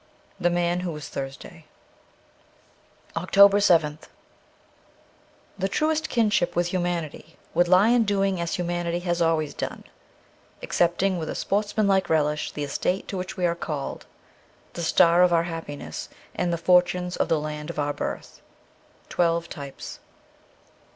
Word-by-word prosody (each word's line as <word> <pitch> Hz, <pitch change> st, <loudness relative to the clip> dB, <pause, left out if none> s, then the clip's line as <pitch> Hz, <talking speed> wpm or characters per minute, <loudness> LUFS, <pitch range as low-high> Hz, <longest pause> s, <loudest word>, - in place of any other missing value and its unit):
' -, -, -33 dB
The -, -, +6 dB
Man 175 Hz, 0 st, 0 dB
who 180 Hz, -1 st, -3 dB
was 150 Hz, -2 st, -7 dB
Thursday.' 135 Hz, -1 st, -7 dB, 1.5 s
312 165 Hz, +2 st, -4 dB, 0.2 s
OCTOBER 200 Hz, -, +3 dB
7th 160 Hz, -6 st, +3 dB, 1.6 s
THE 195 Hz, +1 st, 0 dB
truest 315 Hz, +7 st, 0 dB
kinship 215 Hz, -7 st, +1 dB
with 175 Hz, 0 st, +1 dB
humanity 170 Hz, -3 st, -3 dB, 0.2 s
would 175 Hz, 0 st, +3 dB
lie 185 Hz, +5 st, +5 dB
in 240 Hz, -1 st, +4 dB
doing 195 Hz, -3 st, 0 dB
as 170 Hz, -, -2 dB
humanity 175 Hz, -1 st, -2 dB
has 175 Hz, -1 st, -1 dB
always 160 Hz, -3 st, +1 dB
done, -, -, -5 dB, 0.8 s
accepting 180 Hz, +2 st, +1 dB
with 155 Hz, -, -4 dB
a -, -, -4 dB
sportsman 205 Hz, +1 st, 0 dB
like 190 Hz, -2 st, +2 dB
relish 150 Hz, -1 st, +1 dB
the 150 Hz, -, -4 dB
estate 180 Hz, +6 st, -2 dB
to 195 Hz, -, -3 dB
which 185 Hz, +2 st, -5 dB
we 180 Hz, -, +1 dB
are 170 Hz, -, +2 dB
called, 155 Hz, -4 st, -5 dB, 0.7 s
the 170 Hz, -, -5 dB
star 170 Hz, +1 st, +4 dB
of 180 Hz, -1 st, +5 dB
our 165 Hz, -1 st, +3 dB
happiness, 160 Hz, -, -6 dB, 0.2 s
and 180 Hz, -1 st, -1 dB
the 170 Hz, -, 0 dB
fortunes 180 Hz, +1 st, +2 dB
of -, -, -1 dB
the 160 Hz, -, +2 dB
land 150 Hz, 0 st, -5 dB
of -, -, -6 dB
our 145 Hz, -1 st, 0 dB
birth. -, -, -6 dB, 0.3 s
' -, -, -33 dB
Twelve 170 Hz, -1 st, +1 dB
Types.' 140 Hz, -3 st, -8 dB
175 Hz, 150 wpm, -25 LUFS, 160-185 Hz, 1.6 s, The